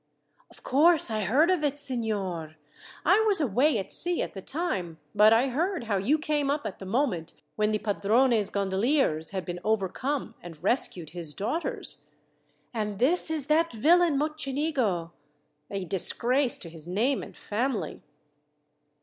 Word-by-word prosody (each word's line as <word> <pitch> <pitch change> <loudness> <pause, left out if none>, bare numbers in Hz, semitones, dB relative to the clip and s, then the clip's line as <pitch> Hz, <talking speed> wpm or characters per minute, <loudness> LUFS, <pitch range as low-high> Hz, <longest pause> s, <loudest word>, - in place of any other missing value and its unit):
"Of - - -18
course 300 0 +4
I 215 -2 -1
heard 295 - +3
of 355 -5 +1
it, 290 -1 0
signor. 205 - -2 0.5
I - - +5
was 405 -4 +4
away 270 +1 +2
at 195 - -5
sea 350 0 +1
at - - -6
the 195 - -7
time, 190 - -3 0.2
but 210 +1 +6
I 235 +4 +4
heard 335 +4 -1
how 215 -3 -1
you 240 +11 +2
came 295 -2 -1
up 290 +1 -1
at 190 - -5
the 190 - -8
moment 200 - -1 0.2
when 210 0 +1
the 215 - +1
padrone's 215 +2 +2
gondoliers 195 - +1
had 190 -2 -4
been 175 0 -5
overcome, 220 +6 -1
and 165 -2 -11
rescued 180 - 0
his 165 -3 -2
daughters. 245 - -3 0.7
And 210 -3 -3
this 320 - +3
is 310 -4 -1
that 320 +3 +2
villain 325 +6 +4
Mocenigo, 275 - -1 0.6
a 195 -2 -4
disgrace 240 +8 +1
to 170 - -9
his 165 -1 -10
name 230 +10 +1
and - - -11
family!" 210 - -3
230 Hz, 155 wpm, -27 LUFS, 195-290 Hz, 0.7 s, but